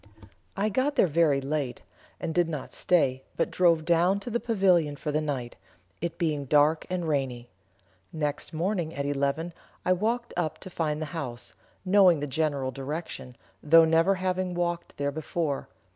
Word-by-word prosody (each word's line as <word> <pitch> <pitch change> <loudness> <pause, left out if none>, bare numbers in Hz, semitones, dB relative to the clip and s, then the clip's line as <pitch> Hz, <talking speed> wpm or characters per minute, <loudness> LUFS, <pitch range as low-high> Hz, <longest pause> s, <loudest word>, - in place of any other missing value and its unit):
I 205 +2 +1
got 260 +7 0
there - - +5
very 155 -4 +3
late, 135 -2 -3 0.4
and 160 - -3
did 175 -1 +2
not 150 -4 -5
stay 135 -7 +2
but - - 0
drove 170 -3 +3
down 175 +4 +3
to 240 - -6
the 235 - 0
Pavilion 185 -10 +2
for 150 +1 -4
the 155 +1 +1
night, 135 -6 -4 0.4
it 170 0 -3
being 150 -4 -1
dark 150 +3 +3
and 180 -2 -2
rainy. 130 -5 -2 0.6
Next 150 -2 -2
morning 170 0 -2
at 140 - -2
eleven 145 +4 -1 0.3
I 185 - +4
walked 235 +6 -1
up 165 -3 -1
to 185 - -9
find 155 -2 -1
the 155 - -8
house, 125 -8 -6 0.3
knowing 185 -4 +5
the 145 - -2
general 140 -2 -1
direction, 135 -1 -6 0.3
though 165 +2 +7
never 165 +4 +3
having 185 -1 -1
walked 175 -1 -2
there 140 0 -1
before. 155 -1 -3
160 Hz, 165 wpm, -27 LUFS, 145-180 Hz, 0.6 s, though